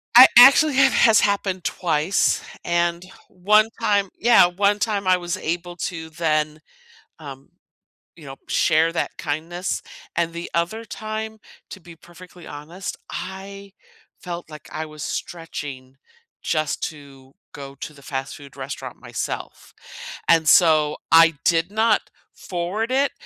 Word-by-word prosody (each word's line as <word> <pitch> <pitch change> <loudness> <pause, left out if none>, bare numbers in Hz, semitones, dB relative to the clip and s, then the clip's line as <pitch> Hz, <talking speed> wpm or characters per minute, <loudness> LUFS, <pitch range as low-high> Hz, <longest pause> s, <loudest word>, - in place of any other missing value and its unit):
I, 250 +2 +11
actually, 275 +4 +8
that 270 0 +5
has 225 -3 +5
happened 195 -3 -1
twice, 165 +2 0 0.2
and 170 0 -1 0.2
one 210 +4 +3
time 200 -2 +1
yeah, 235 -5 +6
one 200 +3 +1
time 205 -2 -1
I 185 0 +5
was 175 -1 -4
able 175 +2 -4
to 160 -2 -5
then, 155 -2 -1 0.6
um, 140 -2 -11 0.7
you 160 - -15
know, 135 -1 -8
share 160 +2 +2
that 165 - -2
kindness, 165 +5 -4 0.3
and 170 -1 -1
the 170 +1 -6
other 175 +7 -1
time, 220 0 -6 0.3
to 195 - -9
be 170 -1 -14
perfectly 175 +1 -15
honest, 160 +6 -8
I 195 +1 -8 0.5
felt 175 -2 -7
like 150 -1 -12
I 155 0 -4
was 155 -1 -9
stretching 145 -6 -6 0.5
just 155 -2 -2
to 140 -3 -16 0.2
go 140 -1 -9
to 150 - -8
the 140 - -17
fast 135 0 -5
food 140 -2 -14
restaurant 135 +1 -7
myself, - - -6 0.5
and 165 -1 +4
so, 155 -3 +4
I 165 0 +7
did 170 +1 +1
not 220 +1 +1 0.2
forward 190 +7 -4
it, 275 +2 +2
170 Hz, 135 wpm, -22 LUFS, 155-200 Hz, 0.7 s, I